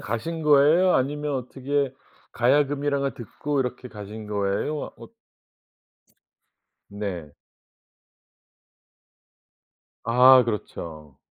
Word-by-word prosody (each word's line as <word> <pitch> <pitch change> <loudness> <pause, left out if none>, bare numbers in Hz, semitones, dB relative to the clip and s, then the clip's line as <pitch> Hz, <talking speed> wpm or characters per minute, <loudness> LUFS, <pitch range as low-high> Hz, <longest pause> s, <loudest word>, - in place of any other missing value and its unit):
가신 160 +10 -4
거예요? 150 +5 +5
아니면 145 +2 -1
어떻게 135 +2 -2 0.4
가야금이라는 140 +3 +1
걸 140 0 -2
듣고 140 +4 -3
이렇게 125 0 -4
가신 105 0 -9
거예요? 105 +8 -2
어 - - -12 1.8
네. 95 -7 -6 2.7
아 125 +3 +7
그렇죠. 80 - -6
130 Hz, 180 characters per minute, -24 LUFS, 105-145 Hz, 2.7 s, 아